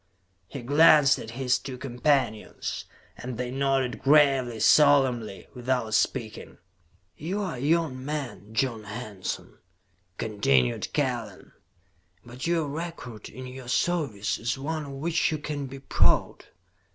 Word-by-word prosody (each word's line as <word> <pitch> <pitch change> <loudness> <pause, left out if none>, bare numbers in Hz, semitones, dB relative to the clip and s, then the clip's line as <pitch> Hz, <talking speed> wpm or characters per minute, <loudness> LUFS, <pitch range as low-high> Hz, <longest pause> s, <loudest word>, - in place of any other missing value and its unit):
He 130 +5 -8
glanced 150 +1 +6
at 110 - -8
his 130 -1 +1
two 130 -2 -7
companions, 125 -3 -1 0.3
and 125 -1 -6
they 125 0 -3
nodded 135 -2 0
gravely, 135 -5 +4
solemnly, 130 -9 +4
without 125 -3 -1
speaking. 110 0 -1 0.6
"You 180 +7 -3
are 185 -4 -3
a 125 - -7
young 145 -2 0
man, 130 -9 -5
John 115 -2 -1
Hanson," 105 -3 -6 0.6
continued 70 - +1
Kellen, 120 -8 -2 0.7
"but 125 +5 -6
your 165 -3 +1
record 145 -8 -6
in 130 +3 -9
your 130 0 -9
service 135 - 0
is 120 +4 -2
one 155 +2 -3
of 140 - -8
which 160 +5 0
you 155 - -1
can 145 -1 -4
be 135 +1 -8
proud. 135 - +1
130 Hz, 130 wpm, -27 LUFS, 120-145 Hz, 0.7 s, glanced